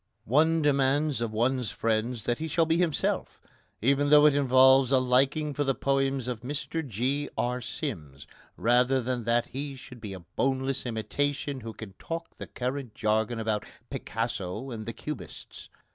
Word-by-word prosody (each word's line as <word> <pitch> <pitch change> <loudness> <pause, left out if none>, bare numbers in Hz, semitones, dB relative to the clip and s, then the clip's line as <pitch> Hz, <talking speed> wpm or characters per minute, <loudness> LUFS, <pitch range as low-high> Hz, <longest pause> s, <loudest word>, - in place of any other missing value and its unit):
One 160 +6 +3
demands 140 0 +2
of 115 -2 -1
one's 120 +2 0
friend 115 +2 0
that 120 +3 -2
he 160 - -3
shall 165 +1 +2
be 165 +1 +2
himself, 170 -4 0 0.4
even 140 +3 +3
though 150 0 +7
it 150 - +6
involves 130 -1 +5
a 135 - +5
liking 135 +4 +2
for 145 - 0
the 135 -2 0
poems 135 -2 0
of 120 -3 -3
Mr 150 +5 -3
G. 135 +4 -1
R. 125 +1 -1
Sims, 75 - -5 0.3
rather 125 +3 +3
than 125 -2 -2
that 120 +1 +1
he 140 +1 -5
should 125 -2 -12
be 105 -3 -6
a 95 - -8
boneless 135 0 0
imitation 140 +5 -2
who 115 0 -7
can 105 -3 -9
talk 165 0 -6
the - - -7
current 130 -2 -4
jargon 110 +2 0
about 110 -2 -1 0.3
Picasso 115 +1 -3
and 110 -2 -6
the 115 - -3
cubists. - - -8
130 Hz, 165 wpm, -28 LUFS, 115-140 Hz, 0.4 s, though